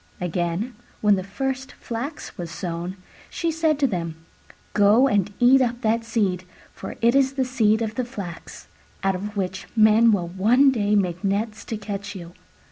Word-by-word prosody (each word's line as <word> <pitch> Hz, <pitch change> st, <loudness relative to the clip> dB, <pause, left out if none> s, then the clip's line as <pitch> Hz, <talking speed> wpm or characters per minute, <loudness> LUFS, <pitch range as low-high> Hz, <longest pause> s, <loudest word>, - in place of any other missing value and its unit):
Again, 180 Hz, +6 st, -2 dB, 0.3 s
when 210 Hz, -1 st, +5 dB
the 190 Hz, -2 st, 0 dB
first 265 Hz, +6 st, -4 dB
flax 245 Hz, +7 st, -6 dB
was 175 Hz, -2 st, -6 dB
sown, 175 Hz, +2 st, -5 dB, 0.3 s
she 335 Hz, -1 st, -1 dB
said 320 Hz, -2 st, +1 dB
to 285 Hz, -, +2 dB
them, 170 Hz, -9 st, -2 dB, 0.6 s
"Go 210 Hz, +6 st, +5 dB
and 205 Hz, -5 st, +1 dB
eat 260 Hz, +2 st, +6 dB
up 240 Hz, -1 st, 0 dB
that 230 Hz, 0 st, +1 dB
seed, 205 Hz, -6 st, 0 dB, 0.3 s
for -, -, -8 dB
it 235 Hz, +1 st, +4 dB
is 270 Hz, 0 st, +3 dB
the 265 Hz, -1 st, 0 dB
seed 225 Hz, -3 st, +2 dB
of 220 Hz, -1 st, -3 dB
the 255 Hz, -, -1 dB
flax, 200 Hz, -9 st, -8 dB, 0.4 s
out 195 Hz, 0 st, +2 dB
of 205 Hz, +3 st, -5 dB
which 190 Hz, -1 st, -3 dB
men 220 Hz, +1 st, +6 dB
will 180 Hz, -5 st, 0 dB
one 235 Hz, +10 st, +4 dB
day 210 Hz, -4 st, +1 dB
make 180 Hz, -2 st, 0 dB
nets 210 Hz, +3 st, -1 dB
to 225 Hz, -, -4 dB
catch 200 Hz, -1 st, -6 dB
you." 175 Hz, -2 st, -9 dB
210 Hz, 175 wpm, -23 LUFS, 190-245 Hz, 0.6 s, eat